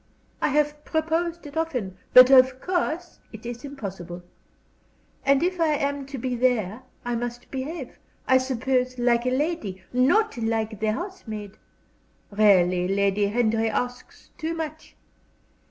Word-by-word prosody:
I - - +3
have 295 +1 0
proposed 330 +1 -1
it 285 - -10
often, 255 - -2 0.2
but 255 +1 +9
of 260 -1 +6
course 350 0 -2
it 220 +1 -11
is 240 0 -6
impossible. 190 -10 -7 1.0
And 275 +2 +3
if 360 0 0
I 315 -2 +3
am 280 -1 -2
to 275 0 -6
be 250 0 -2
there 235 -3 0 0.2
I 245 - -1
must 240 +1 -5
behave, 270 +1 -6 0.3
I 260 0 +5
suppose, 255 0 -1
like 240 0 +2
a - - +4
lady, 255 - -2
not 290 - +3
like 225 -2 -1
the 215 0 +1
housemaid. 220 - -6 0.8
Really, 185 -4 +4
Lady 200 +1 +1
Henry 225 0 +1
asks 245 +3 -5
too 325 +1 -2
much. 315 -1 -6
255 Hz, 140 wpm, -25 LUFS, 220-300 Hz, 1.0 s, but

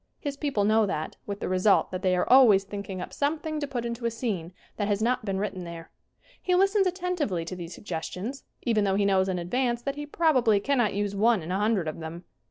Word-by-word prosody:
His 285 -2 -4
people 280 -8 -1
know 215 +1 +3
that, 155 -5 -3
with 200 0 -5
the - - -2
result 185 +2 +3
that 185 0 -4
they 185 -1 +2
are 180 - 0
always 240 -7 +7
thinking 200 -1 -6
up 180 - -7
something 305 +1 -1
to 290 - -3
put 245 -3 -3
into 235 0 -2
a - - +1
scene 220 -8 -3 0.3
that 205 - -1
has 205 -1 +1
not 235 0 0
been 195 -2 -1
written 195 -2 -3
there. 170 -1 -9 0.5
He 360 - +1
listens 390 +1 +3
attentively 350 - -2
to 185 - -5
these 170 -1 -7
suggestions, 195 +7 -5 0.2
even 225 -4 +2
though 195 -1 +1
he 200 0 +2
knows 190 -1 +3
in 185 - -1
advance 240 +7 -1
that 275 +2 -3
he 295 0 -5
probably 255 -10 +3
cannot 240 -3 +1
use 205 0 -1
one 215 -2 +3
in 165 - -5
a 190 - 0
hundred 210 -5 +1
of 155 - -4
them. 165 +2 -7
210 Hz, 230 wpm, -27 LUFS, 185-260 Hz, 0.5 s, always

